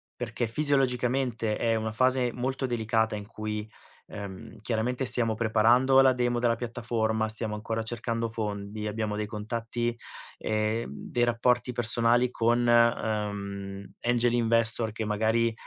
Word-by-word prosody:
perché 120 0 -3
fisiologicamente 125 -4 0
è 115 -1 +1
una 110 0 -2
fase 130 +1 +2
molto 130 +2 -2
delicata 110 -2 0
in 105 - -8
cui, 110 -1 -5 0.4
ehm, 100 +2 -8
chiaramente 120 +3 -1
stiamo 115 -2 +3
preparando 115 +4 +4
la 130 -1 +6
demo 120 -1 0
della 120 -1 +2
piattaforma, 115 -2 -1
stiamo 110 0 -3
ancora 110 +1 -3
cercando 115 0 -3
fondi, 105 -1 -4
abbiamo 105 -1 -2
dei 105 -1 -2
contatti, 115 +2 -3 0.4
ehm, 110 +2 -1
dei 120 - -3
rapporti 120 +1 +1
personali 120 +1 +3
con, 120 +1 +1
ehm, 100 -4 0
Angel 120 0 +2
Investor 115 -1 +3
che 110 - -4
magari 110 +2 +1
115 Hz, 130 wpm, -27 LUFS, 110-120 Hz, 0.4 s, la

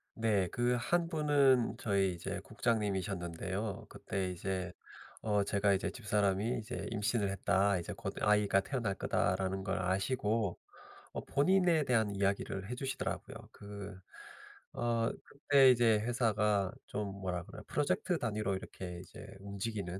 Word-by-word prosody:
네, 105 -5 +2
그 120 +1 +1
1 170 +6 +1
분은 145 -6 +3
저희 100 -3 +1
이제 85 - -4
국장님이셨는데요. 100 -2 -2
그때 95 -1 -3
이제 90 0 -3 0.5
어 105 -2 +2
제가 100 0 +2
이제 95 - 0
"집사람이 105 +1 0
이제 110 - -5
임신을 105 -1 0
했다. 100 0 +2
이제 85 - -5
곧 - - -5
아이가 105 -2 +4
태어날 115 -2 -2
거다."라는 95 0 0
걸 95 0 -1
아시고 105 +2 0 0.5
어 - - -5
본인에 175 +1 +3
대한 110 -5 +2
이야기를 100 0 -1
해주시더라고요. 130 +2 -4
그 100 -1 -9 0.8
어 115 -1 +1
그때 140 -1 +5
이제 115 -3 +4
회사가 105 -4 +1 0.2
좀 105 -1 -3
뭐라 90 -2 -2
그래 - - -10
프로젝트 170 +4 0
단위로 105 -4 -1
이렇게 90 -2 -7 0.4
움직이는 100 -2 -4
105 Hz, 295 characters per minute, -33 LUFS, 95-120 Hz, 0.8 s, 그때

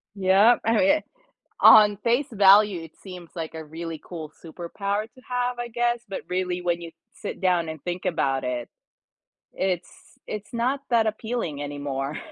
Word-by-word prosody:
Yep, 195 +5 +4
I 225 +1 +3
mean, 295 +2 +4 0.6
on 210 -1 +8
face 240 +5 +1
value, 200 -3 +5
it 160 - -11
seems 180 -3 -10
like 165 -2 -5
a 160 -1 -6
really 160 0 -7
cool 160 -4 -8
superpower 200 +5 -3
to 230 +3 -17
have, 245 0 -1
I 240 0 -4
guess, 240 0 0
but 195 - -5
really, 180 -1 -1
when 175 -1 0
you 170 - -8 0.2
sit 205 - -7
down 180 -3 +2
and 160 -3 -7
think 175 +2 -4
about 135 -7 0
it, 125 -1 -3 0.8
it's 185 -2 -2 0.4
it's 210 -1 -7
not 250 +4 0
that 230 -2 +3
appealing 215 -9 -3
anymore. 145 0 -4
185 Hz, 160 wpm, -25 LUFS, 165-225 Hz, 0.8 s, on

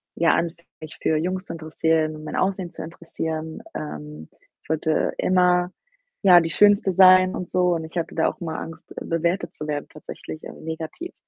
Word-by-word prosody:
ja, 165 0 +3
anfing, 170 0 -2
mich 155 0 -10
für 160 - +2
Jungs 185 +4 -2
zu - - -6
interessieren, 155 -1 0
mein 155 - -5
Aussehen 185 -2 -1
zu - - -7
interessieren 160 -1 -5
ähm, 75 0 -7 0.3
ich - - -25
wollte 160 0 +1
immer, 180 -1 +3 0.5
ja, 180 -3 +8
die 165 -1 -1
Schönste 205 0 +4
sein 185 0 +7
und 180 - -5
so 180 -1 +2
und 160 - -3
ich 160 +2 -8
hatte 165 - -3
da 160 - +3
auch - - -10
immer 160 -2 -4
Angst, 165 0 -9
bewertet 170 +3 -1
zu 150 - -6
werden 145 -1 -3
tatsächlich, 155 +1 -9
äh, - - -8
negativ. 160 - -6
165 Hz, 180 wpm, -23 LUFS, 155-180 Hz, 0.5 s, ja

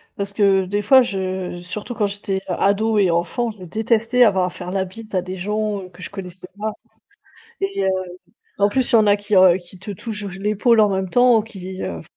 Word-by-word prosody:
parce 200 0 -2
que 195 -2 +3
des 205 +2 -2
fois 260 +5 +7
je 190 -5 -3
surtout 210 +6 -6
quand 215 - +1
j'étais 200 -1 -3
ado 210 +2 +1
et 190 -3 +3
enfant, 175 +8 0
je 210 -4 -10
détestais 225 +5 +2
avoir 190 -5 +3
à - - -2
faire 180 0 -8
la 190 0 -1
bise 215 +2 -9
à 180 - +1
des 185 +1 -6
gens, 210 +2 -2
heu, 185 - -11
que 180 0 -13
je - - -7
connaissais 180 -2 -8
pas 215 +1 -2 0.9
et 390 - -1
heu, - - +2 0.7
en 200 0 +4
plus 255 +4 0
il - - +7
y - - +7
en 215 - +4
a 205 0 +5
qui 205 +1 -2 0.2
qui 180 0 -12
te 195 +3 -8
touchent 210 +1 -6
l'épaule 215 +3 +2
en 210 -1 +4
même 190 0 -2
temps, 245 +2 +4
qui, 190 -4 -8
heu 85 -2 -5
200 Hz, 215 wpm, -21 LUFS, 185-220 Hz, 0.9 s, fois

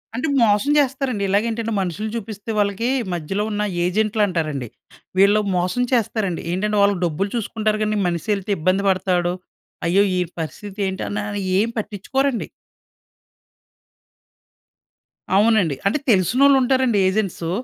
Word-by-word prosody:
అంటే 260 +6 -1
మోసం 215 +6 +3
చేస్తారండి. 260 -6 0
ఇలాగే 205 +3 +2
ఏంటంటే 225 0 -3
మనుషుల్ని 205 +4 -3
చూపిస్తే 215 0 -7
వాళ్ళకి 205 +4 0 0.2
మధ్యలో 185 +5 -2
ఉన్న 210 0 -1 0.2
ఏజెంట్‌లు 215 +3 0
అంటారండి. 155 -8 -2 0.5
వీళ్ళు 205 +2 +5 0.2
మోసం 180 +8 0
చేస్తారండి. 210 -6 0
ఏంటంటే, 210 +3 -1
వాళ్ళు 200 0 +3
డబ్బులు 180 +5 -1
చూసుకుంటారు 215 -1 -1
గాని, 215 0 0
మనీషెల్తే 195 +4 -2
ఇబ్బంది 185 +5 +1
పడతాడు. 180 -2 +1 0.5
అయ్యో! 190 +4 +4 0.2
ఈడు 180 -1 -2
పరిస్థితి 200 +5 -7
ఏంటి 190 0 -4
ఆనే 205 0 -3 0.2
అయ్యేం 190 +4 +1
పట్టించుకోరండి. 240 +5 -1 2.9
అవునండి. 210 -8 +3
అంటే 200 - +2
తెలిసినోళ్ళు 255 +9 +4
ఉంటారండి 255 -4 +2
ఏజెంట్సూ. 190 -4 -1
205 Hz, 120 wpm, -21 LUFS, 185-220 Hz, 2.9 s, వీళ్ళు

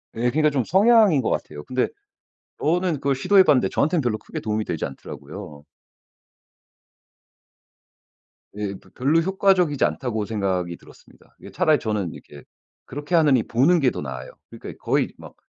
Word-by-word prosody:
예. 115 - -5
그러니까 155 +3 +2
좀 135 -3 0
성향인 205 - +5
것 - - -1
같아요. 75 - -4
근데 125 +7 -1 0.7
저는 175 +2 +1
그걸 140 -1 0
시도해 190 +8 +5
봤는데 145 -7 +3
저한테는 160 +2 +1
별로 115 -4 -1
크게 - - -8
도움이 110 0 -2
되지 80 - -3
않더라고요. 75 +3 -9 2.9
예. 100 -2 -4
'벼 - - -22
별로 145 +6 +2
효과적이지 185 -5 +2
않다.'고 110 -5 -2
생각이 95 -5 -2
들었습니다. - - -20
이게 - - -12
차라리 155 -6 +2
저는 105 -6 -2
이렇게 70 -2 -13 0.4
그렇게 145 +5 -3
하느니 145 -8 +4
보는 150 +9 +3
게 130 -4 +2
더 - - -6
나아요. 65 -2 -7 0.2
그러니까 - - -9
거의 - - 0
막 - - -13
130 Hz, 360 characters per minute, -23 LUFS, 105-165 Hz, 2.9 s, 성향인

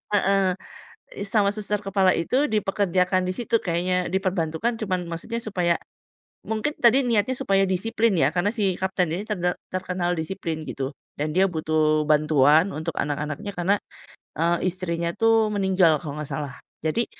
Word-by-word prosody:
heeh, 195 -2 +2 0.6
i - - -2
sama 200 -1 +3
suster 210 0 -2
kepala 195 -1 +3
itu 260 - +1
dipekerjakan 185 -3 +1
di 185 - -1
situ 230 -1 0
kayaknya, 180 +1 0
diperbantukan 185 +4 -1
cuma 195 -4 -1
maksudnya 175 +8 -5
supaya 180 -5 +1 0.7
mungkin 220 +7 -1
tadi, 250 +3 +6
niatnya 230 +1 +2
supaya 195 -7 +2
disiplin 225 +3 +1
ya, 135 -2 +4
karena 180 +3 +1
si 200 -5 +1
kapten 190 -3 0
ini 195 +4 -3
terde 180 -3 0 0.2
terkenal 180 -1 -1
disiplin, 160 -1 -4
gitu. 135 0 -3 0.3
Dan 150 +1 -2
dia 190 - +5
butuh 155 -2 +1
bantuan 150 +3 +4
untuk 160 +2 -4
anak-anaknya, 150 +6 -3
karena, 190 +4 +2 0.6
eee, 170 +2 +1
istrinya 170 -2 -2
tuh 225 -1 +3
meninggal 185 -5 +3
kalau 150 -1 -6
nggak 150 - -6
salah. 145 -4 -4 0.3
Jadi, 160 +10 0
185 Hz, 150 wpm, -24 LUFS, 165-205 Hz, 0.7 s, tadi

